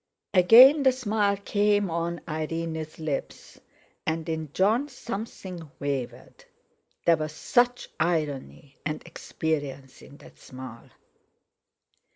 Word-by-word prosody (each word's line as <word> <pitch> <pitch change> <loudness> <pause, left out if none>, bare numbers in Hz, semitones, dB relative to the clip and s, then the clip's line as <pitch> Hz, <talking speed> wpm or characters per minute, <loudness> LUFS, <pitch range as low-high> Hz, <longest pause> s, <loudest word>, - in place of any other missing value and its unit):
Again 240 - +8
the 265 -1 +5
smile 210 -5 0
came 205 -1 +1
on 170 +1 -2
Irene's 160 0 -4
lips, 155 -3 -5 0.4
and 160 +1 -2
in 160 -3 -3
Jon 220 - +2
something 195 - -7
wavered; 140 -3 -5 0.6
there 170 -1 +5
was 155 0 -4
such 245 - +1
irony 145 - -2
and 155 0 -4
experience 145 -5 -4
in 145 - -14
that - - -17
smile. 130 -3 -11
165 Hz, 105 wpm, -26 LUFS, 150-205 Hz, 0.6 s, Again